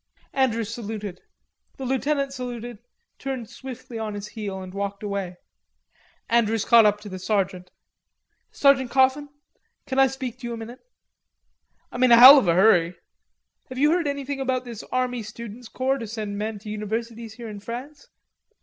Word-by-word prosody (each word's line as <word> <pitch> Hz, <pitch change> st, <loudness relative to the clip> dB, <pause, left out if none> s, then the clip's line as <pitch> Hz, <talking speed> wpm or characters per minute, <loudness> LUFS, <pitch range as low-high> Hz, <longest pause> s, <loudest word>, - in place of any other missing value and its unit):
Andrews 230 Hz, -4 st, 0 dB
saluted. 210 Hz, -5 st, -6 dB, 0.6 s
The 265 Hz, -, -5 dB
lieutenant 275 Hz, +2 st, 0 dB
saluted, 240 Hz, -3 st, -6 dB, 0.4 s
turned 255 Hz, -4 st, -5 dB
swiftly 255 Hz, -3 st, -8 dB
on 215 Hz, -2 st, -4 dB
his 205 Hz, +1 st, -6 dB
heel 200 Hz, -3 st, -5 dB
and 185 Hz, -1 st, -9 dB
walked 200 Hz, 0 st, -4 dB
away. 200 Hz, -3 st, -4 dB, 0.9 s
Andrews 225 Hz, -2 st, +2 dB
caught 230 Hz, -2 st, +7 dB
up 205 Hz, 0 st, +1 dB
to 210 Hz, -, -10 dB
the 185 Hz, -1 st, -7 dB
sergeant. 185 Hz, -2 st, -1 dB, 0.8 s
"Sergeant 270 Hz, -3 st, +3 dB
Coffin. 270 Hz, +3 st, +2 dB, 0.6 s
Can 265 Hz, 0 st, -1 dB
I 270 Hz, -, +7 dB
speak 260 Hz, -2 st, -6 dB
to 245 Hz, -, -6 dB
you 235 Hz, -, -4 dB
a -, -, -5 dB
minute?" 230 Hz, +3 st, -9 dB, 1.1 s
"I'm 245 Hz, -, -5 dB
in 255 Hz, -1 st, +5 dB
a 235 Hz, -, +9 dB
hell 265 Hz, +4 st, +11 dB
of 240 Hz, -, -2 dB
a 170 Hz, -, +3 dB
hurry." 180 Hz, -3 st, +4 dB, 0.7 s
"Have 255 Hz, -, -8 dB
you 295 Hz, +3 st, +4 dB
heard 340 Hz, -2 st, +1 dB
anything 280 Hz, -1 st, -3 dB
about 255 Hz, -1 st, -1 dB
this 235 Hz, -3 st, -7 dB
army 250 Hz, -1 st, -1 dB
students' 225 Hz, +2 st, -9 dB
corps 265 Hz, +1 st, -1 dB
to 230 Hz, -, -6 dB
send 210 Hz, -2 st, -5 dB
men 215 Hz, +1 st, -3 dB
to 210 Hz, +1 st, -10 dB
universities 225 Hz, +1 st, -5 dB
here 235 Hz, -1 st, -8 dB
in 210 Hz, -2 st, -7 dB
France? 255 Hz, +7 st, -8 dB
235 Hz, 170 wpm, -24 LUFS, 210-260 Hz, 1.1 s, hell